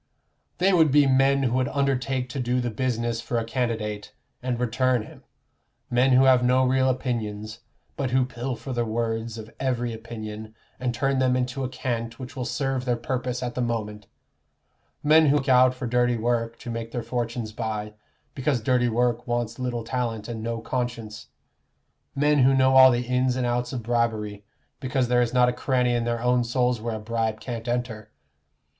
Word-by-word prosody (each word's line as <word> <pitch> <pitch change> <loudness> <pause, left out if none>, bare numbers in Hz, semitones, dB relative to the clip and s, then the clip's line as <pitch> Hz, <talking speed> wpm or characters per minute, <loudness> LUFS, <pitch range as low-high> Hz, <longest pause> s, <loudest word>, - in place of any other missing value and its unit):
"They 190 +2 +3
would 160 -3 +5
be 145 +1 +5
men 135 +1 +3
who 120 -2 +1
would 130 -1 +1
undertake 135 -2 0
to 135 - -5
do 125 0 0
the 120 -1 -2
business 120 0 -1
for 120 - -2
a 115 - 0
candidate, 115 -4 -3 0.3
and 125 -1 -2
return 125 0 +1
him: - - -14 0.7
men 125 +2 +3
who 130 +1 +6
have 130 -2 +5
no 130 +1 +3
real 130 +1 +2
opinions, 110 -4 -3 0.4
but 140 -3 -1
who 130 0 +2
pilfer 125 +1 -5
the 120 -1 0
words 115 0 -2
of 110 0 -10
every 120 -3 -1
opinion, 110 -1 -8 0.2
and 125 -1 -1
turn 135 +2 0
them 130 -1 +2
into 130 +2 -2
a 130 - -2
cant 115 -3 -4
which 130 +1 -9
will 125 -2 -3
serve 135 -1 -1
their 125 -1 +1
purpose 125 +1 -3
at 120 -1 -3
the 125 - -2
moment; 105 -3 -3 1.0
men 155 +1 +6
who 140 - +4
look 140 -1 -3
out 130 0 +5
for 125 - -5
dirty 120 0 +2
work 115 0 -1
to 120 - -6
make 115 0 -5
their 120 - -3
fortunes 115 -1 -3
by, 105 -1 -4 0.4
because 135 -1 0
dirty 125 +1 +2
work 120 +1 0
wants 120 -1 -2
little 125 -2 -2
talent 115 -3 -3
and 115 -2 -5
no 115 0 -3
conscience; 120 -3 -4 0.9
men 150 +1 +3
who 135 +1 +5
know 130 0 +4
all 130 0 +9
the 120 0 0
ins 125 +1 +1
and 130 -1 -1
outs 120 0 -1
of 125 -3 -4
bribery, 110 -3 -1 0.4
because 130 -1 -1
there 125 0 +4
is 120 -1 0
not 125 -1 +4
a 125 - +1
cranny 125 -1 +1
in 120 -1 0
their 120 0 -2
own 125 0 +3
souls 125 -1 0
where 115 0 -3
a - - -5
bribe 110 0 -2
can't 115 -1 -6
enter. 120 -3 -3
120 Hz, 190 wpm, -25 LUFS, 115-130 Hz, 1.0 s, all